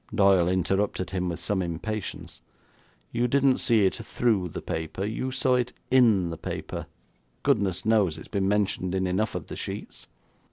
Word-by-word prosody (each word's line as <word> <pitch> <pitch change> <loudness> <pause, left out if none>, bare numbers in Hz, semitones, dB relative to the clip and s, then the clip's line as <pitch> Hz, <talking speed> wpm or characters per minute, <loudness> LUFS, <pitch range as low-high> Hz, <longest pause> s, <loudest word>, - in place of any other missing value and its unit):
Doyle 95 -4 +5
interrupted 95 +1 0
him 90 -1 -1
with 85 - -4
some 100 -2 -1
impatience. 95 +5 -5 0.7
'You 120 +1 +1
didn't 135 +1 +3
see 115 -5 +4
it 95 - +2
through 105 -7 0
the - - -5
paper; 80 +4 -3
you 110 +5 -2
saw 130 0 +1
it 125 0 +1 0.2
in 110 -9 +4
the 80 - -7
paper. - - -5 0.6
Goodness 95 -3 +1
knows, 105 -7 +3
it's - - -10
been 100 -2 -1
mentioned 100 -2 0
in 95 0 +1
enough 95 +4 0
of - - -4
the - - -7
sheets.' - - -7
100 Hz, 165 wpm, -27 LUFS, 90-115 Hz, 0.7 s, Doyle